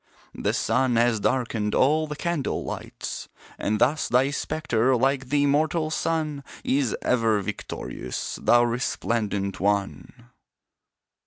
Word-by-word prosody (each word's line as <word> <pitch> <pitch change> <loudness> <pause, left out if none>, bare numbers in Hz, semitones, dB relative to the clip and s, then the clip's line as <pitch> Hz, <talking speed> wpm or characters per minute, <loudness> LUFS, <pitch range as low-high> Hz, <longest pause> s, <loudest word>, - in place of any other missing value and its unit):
The - - -1
sun 125 +2 +1
has 115 -1 +3
darkened 115 -3 0
all 155 +4 +3
the 150 - -5
candle 170 -3 -2
lights; - - -6 0.3
And 105 +1 0
thus 135 +7 +2
thy 130 +3 +3
spectre 130 -5 0
like 135 +1 +1
the 145 0 +2
immortal 155 +2 +1
sun, 155 -3 -1 0.2
Is 135 -3 +1
ever 115 -4 +2
victorious 95 -10 -5
thou 120 0 +5
resplendent 115 -4 -1
one! 105 +5 -2
125 Hz, 115 wpm, -25 LUFS, 115-145 Hz, 0.3 s, thou